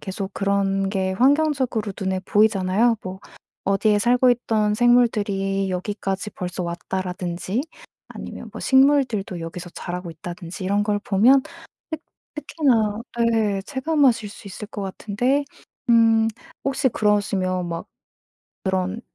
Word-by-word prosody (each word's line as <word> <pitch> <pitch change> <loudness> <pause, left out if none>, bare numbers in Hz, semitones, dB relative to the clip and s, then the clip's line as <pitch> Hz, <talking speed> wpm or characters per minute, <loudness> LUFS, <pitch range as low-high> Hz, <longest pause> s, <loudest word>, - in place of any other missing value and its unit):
계속 190 0 -5
그런 195 -1 0
게 190 -1 -1
환경적으로 260 -4 +2
눈에 190 -1 -1
보이잖아요. 210 +3 +3
뭐 185 0 -7 0.4
'어디에 205 +1 +2
살고 245 +3 +4
있던 215 -3 +1
생물들이 205 -5 +2
여기까지 195 +2 -3
벌써 180 0 -5
왔다.'라든지 180 +4 -3 0.5
아니면 - - -8
뭐 - - -7
'식물들도 265 -9 +3
여기서 170 +2 -7
자라고 180 0 -6
있다.'든지 175 +3 -8
이런 200 +2 +1
걸 205 0 0
보면 230 +7 +4 0.5
특 315 -1 -4 0.3
특히나 235 -9 +1 0.3
예, 205 -3 +1
체감하실 265 -5 +1
수 205 - -13
있을 210 +2 -7
것 205 - -6
같은데 235 +8 -1 0.5
음 225 -1 +5 0.4
혹시 275 0 +1
그러시면 195 -4 +1
막 165 0 -5 0.8
그런 190 +2 -1
205 Hz, 280 characters per minute, -23 LUFS, 190-235 Hz, 0.8 s, 음